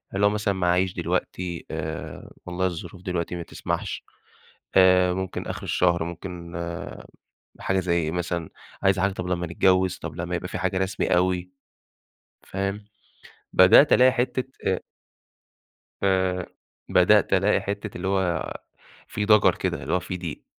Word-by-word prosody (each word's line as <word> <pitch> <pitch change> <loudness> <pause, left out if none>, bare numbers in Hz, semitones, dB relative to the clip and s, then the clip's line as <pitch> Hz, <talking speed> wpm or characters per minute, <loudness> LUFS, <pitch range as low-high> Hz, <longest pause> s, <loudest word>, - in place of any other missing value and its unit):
اللي 100 +1 +3
هو - - +6
مثلًا 105 -1 0
معييش 90 0 +1
دلوقتي، 90 -2 -3
آآ 80 +1 -5 0.2
والله 90 +1 -2
الظروف 90 +1 -5
دلوقتي 90 -1 -3
ما 85 - -5
تسمحش، - - -4 0.7
آآ 90 -1 +6
ممكن 95 -1 -4
آخر - - -5
الشهر، 85 -2 +1
ممكن 85 0 -7 1.1
حاجة 95 0 0
زي 90 -2 0
إيه 80 - -2
مثلًا، 85 -1 -3 0.3
عايزة 95 0 +3
حاجة 100 +1 +2
طَب 90 -1 -5
لمّا 90 -1 -1
نتجوّز، 95 +2 +2
طَب 80 -1 -7
لمّا 85 +1 -3
يبقى 90 +1 -4
في - - -5
حاجة 95 0 -1
رسمي 95 0 -1
أوي، 90 0 +1 1.0
فاهم؟ 100 +2 -3 0.7
بدأت 95 +11 +7
ألاقي 130 +1 +6
حِتّة 130 0 -1 0.2
آآ 95 - +1 1.2
آآ 95 -2 +1 0.4
بدأت - - +4
ألاقي - - +3
حِتّة 100 0 -5
اللي 95 - -3
هو 95 -4 0 0.6
في 105 - -2
ضجر 105 -1 +5
كده، - - -3
اللي - - -4
هو 90 - +2
في 90 0 -5
ضيق. 85 -4 -7
90 Hz, 145 wpm, -25 LUFS, 90-95 Hz, 1.2 s, بدأت